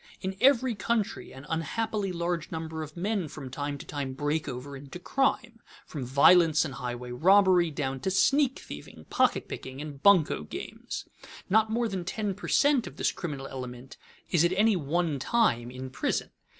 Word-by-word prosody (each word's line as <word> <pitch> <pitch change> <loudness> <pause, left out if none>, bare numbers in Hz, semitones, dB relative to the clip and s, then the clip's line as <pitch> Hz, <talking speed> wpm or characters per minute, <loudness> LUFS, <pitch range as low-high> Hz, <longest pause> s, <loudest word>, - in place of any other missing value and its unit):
In 190 +1 -4
every 255 -2 +4
country 220 +1 -2
an 135 +2 -11
unhappily 200 +5 -2
large 170 -2 -2
number 160 0 -4
of 155 +1 -8
men 195 -1 -1
from 135 -3 -8
time 145 +1 -3
to - - -10
time 140 -3 -4
break 145 +2 -1
over 135 +2 -6
into 135 +4 -9
crime, 235 +2 0 0.3
from 140 -5 -6
violence 160 +5 +5
and 140 - -5
highway 125 -1 -5
robbery 180 +4 +5
down 135 -3 -3
to 135 - -1
sneak 270 +8 +3
thieving, 75 - -10
pocket - - +2
picking, 130 +1 -7
and 145 -2 -7
bunco 180 - +5
games. 75 - -7 0.4
Not 220 +1 +4
more 235 +1 0
than 190 -4 -3
ten 200 +2 -2
per 200 - -8
cent. 285 -4 +3
of - - -10
this - - +1
criminal 145 -6 -5
element 130 -1 -8 0.3
is 170 -2 +4
at 175 +1 +3
any 210 +2 +4
one 160 -1 -1
time 130 - +1
in 130 +1 -7
prison. - - -2
165 Hz, 175 wpm, -28 LUFS, 135-200 Hz, 0.4 s, violence